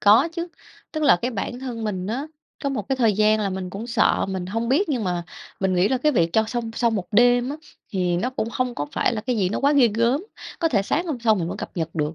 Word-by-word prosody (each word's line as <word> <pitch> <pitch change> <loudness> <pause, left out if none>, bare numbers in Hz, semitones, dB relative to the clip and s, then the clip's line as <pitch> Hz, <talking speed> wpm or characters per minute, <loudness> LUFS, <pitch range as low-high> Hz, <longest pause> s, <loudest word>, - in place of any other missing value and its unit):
Có 215 +10 +6
chứ, 340 +1 -4 0.4
tức 310 -1 -2
là 180 - +6
cái 245 +8 -2
bản 235 +2 -4
thân 240 -4 -5
mình 190 -3 -3
á, 260 +8 -3 0.4
có - - +2
một 230 -8 -3
cái 270 - +1
thời 230 -4 +3
gian 215 +1 +3
là 200 -2 -1
mình 185 -1 -4
cũng 200 +5 -6
sợ, 235 -4 +2
mình 190 -2 -3
hông 225 +5 -2
biết 310 +8 +2
nhưng 245 -8 -1
mà 175 -1 -1 0.4
mình 190 -1 +1
nghĩ 180 +3 +3
là 260 - +1
cái 300 +4 +2
việc 170 -7 +2
cho 220 - +3
xong 230 0 -3
sau 235 -2 +2
1 195 -5 -2
đêm 245 +3 +4
á 295 - -4 0.4
thì 180 -2 +1
nó 245 +8 -1
cũng 230 -3 -3
không 250 -1 -1
có 145 - -3
phải - - +1
là 215 - -2
cái 245 +2 -2
gì 190 -4 +1
nó 195 - -2
quá 280 +1 +4
ghê 265 -5 +5
gớm, 240 - +1 0.3
có 330 - +2
thể 205 -8 +2
sáng 335 - -1
hôm 290 -7 -2
sau 225 -2 +4
mình 170 -5 -2
vẫn - - -4
cập - - -6
nhật 165 -1 -3
được. 150 0 -1
225 Hz, 280 wpm, -23 LUFS, 190-255 Hz, 0.4 s, Có